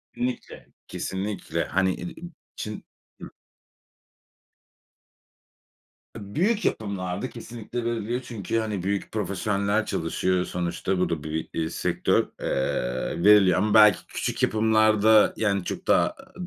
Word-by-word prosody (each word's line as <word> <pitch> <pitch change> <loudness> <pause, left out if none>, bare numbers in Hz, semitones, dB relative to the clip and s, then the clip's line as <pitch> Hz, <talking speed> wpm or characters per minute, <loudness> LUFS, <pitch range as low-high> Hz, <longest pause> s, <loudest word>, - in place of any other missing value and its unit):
İnlikle, 125 +1 -4 0.2
kesinlikle. 95 -4 -3
Hani, 95 0 +1
e - - -5 0.2
im 175 -1 -9 0.2
çın 105 0 -6 0.4
Hıh - - -7 2.9
Eee, 110 - -7
büyük 210 +6 +1
yapımlarda 100 +1 -2
kesinlikle 115 0 -7
veriliyor. 120 +1 -2
Çünkü, 115 -2 -3
hani, 105 -5 -3
büyük 100 +1 -2
profesyoneller 100 +1 -1
çalışıyor 90 +2 -1
sonuçta. 90 +1 -2
Bu 90 - +1
da 80 -3 -3
bi 80 - -6
bir, 80 - -3
eee, 80 - -1
sektör, - - +1 0.2
eee, 65 +3 -2
veriliyor. 100 -3 +6
Ama 105 +2 +1
belki 105 -3 +6
küçük - - -3
yapımlarda, 110 -1 +4
yani, 100 -3 +1
çok - - -6
daha, - - +4
aaa, - - -16
105 Hz, 125 wpm, -25 LUFS, 90-110 Hz, 2.9 s, veriliyor